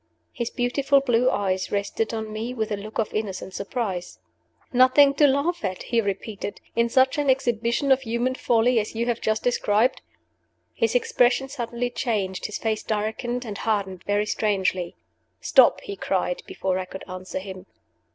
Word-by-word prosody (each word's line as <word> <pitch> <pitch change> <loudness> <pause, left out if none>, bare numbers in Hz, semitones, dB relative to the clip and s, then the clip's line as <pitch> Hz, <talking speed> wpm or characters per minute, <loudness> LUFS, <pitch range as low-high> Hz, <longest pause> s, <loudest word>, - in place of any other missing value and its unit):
His 235 -1 -3
beautiful 270 +3 +2
blue 250 -2 +2
eyes 190 -4 -1
rested 205 +2 -1
on 220 -1 -4
me 230 +4 -4
with 220 -2 -2
a - - +1
look 210 +2 -8
of 225 - -1
innocent 195 -3 -4
surprise. 195 -3 -4 0.6
"Nothing 260 +3 +6
to 290 +1 +5
laugh 285 +5 0
at," 185 -2 -3
he 235 -1 +1
repeated, 205 0 -4 0.2
"in 235 0 +2
such 260 +3 +3
an 290 -2 +1
exhibition 240 +1 +1
of 265 0 +5
human 240 +1 -1
folly 240 -1 +2
as 210 +1 -4
you 230 +1 0
have 240 -1 -1
just 220 0 0
described?" 235 0 +2 0.7
His 460 +1 0
expression 270 - +2
suddenly 245 -2 -3
changed 200 -8 -2
his 210 - -4
face 220 -1 -1
darkened 225 +4 -2
and 210 -3 -6
hardened 195 -4 -1
very 205 +1 +1
strangely. 190 -5 0 0.4
"Stop!" - - +5
he 400 - -6
cried, - - -1
before 190 - -2
I 185 - -3
could 190 +1 -9
answer 185 0 -6
him. 190 0 -7
225 Hz, 165 wpm, -24 LUFS, 205-255 Hz, 0.7 s, Nothing